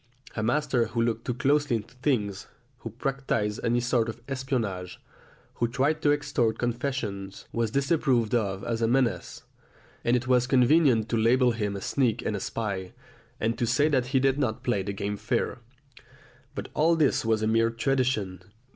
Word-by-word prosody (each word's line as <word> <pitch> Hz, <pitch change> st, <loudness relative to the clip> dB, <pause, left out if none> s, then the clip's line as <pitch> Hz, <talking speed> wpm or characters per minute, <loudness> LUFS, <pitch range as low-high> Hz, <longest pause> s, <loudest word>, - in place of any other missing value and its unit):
A 110 Hz, -, -2 dB
master 120 Hz, 0 st, +1 dB
who 115 Hz, +1 st, -1 dB
looked 115 Hz, 0 st, -1 dB
too 125 Hz, -, -2 dB
closely 145 Hz, 0 st, +2 dB
into 110 Hz, +1 st, -6 dB
things, 120 Hz, -7 st, -1 dB, 0.3 s
who 115 Hz, -, -6 dB
practised 115 Hz, -4 st, -2 dB
any 120 Hz, +1 st, +2 dB
sort 120 Hz, -1 st, +1 dB
of 115 Hz, -, -7 dB
espionage, 120 Hz, -10 st, -3 dB, 0.6 s
who 120 Hz, -, +1 dB
tried 140 Hz, +6 st, 0 dB
to 145 Hz, -, +3 dB
extort 135 Hz, -6 st, 0 dB
confession, 120 Hz, -5 st, -3 dB, 0.2 s
was 115 Hz, -1 st, 0 dB
disapproved 135 Hz, -3 st, +1 dB
of 100 Hz, -5 st, 0 dB
as 115 Hz, -1 st, -2 dB
a 115 Hz, -, +3 dB
menace, 125 Hz, -1 st, 0 dB, 0.6 s
and 120 Hz, -, +3 dB
it 120 Hz, 0 st, -1 dB
was 125 Hz, -1 st, +3 dB
convenient 125 Hz, -3 st, +4 dB
to 115 Hz, -, +1 dB
label 120 Hz, +3 st, +4 dB
him 105 Hz, -3 st, -2 dB
a 100 Hz, -, -5 dB
sneak 120 Hz, 0 st, 0 dB
and 105 Hz, -, -1 dB
a -, -, -3 dB
spy, 95 Hz, -4 st, -4 dB, 0.5 s
and 115 Hz, +3 st, -1 dB
to 120 Hz, -, +1 dB
say 145 Hz, +6 st, +3 dB
that 130 Hz, -4 st, +1 dB
he 135 Hz, 0 st, +2 dB
did 135 Hz, +1 st, +2 dB
not 120 Hz, -3 st, -1 dB
play 120 Hz, -6 st, +1 dB
the 100 Hz, +2 st, -3 dB
game 100 Hz, +1 st, -3 dB
fair. -, -, -1 dB, 1.0 s
But -, -, -5 dB
all 165 Hz, +2 st, +3 dB
this 155 Hz, -4 st, +2 dB
was 110 Hz, -1 st, +1 dB
a -, -, +2 dB
mere 115 Hz, +1 st, +3 dB
tradition. 115 Hz, -6 st, -1 dB
120 Hz, 175 wpm, -27 LUFS, 110-135 Hz, 1.0 s, convenient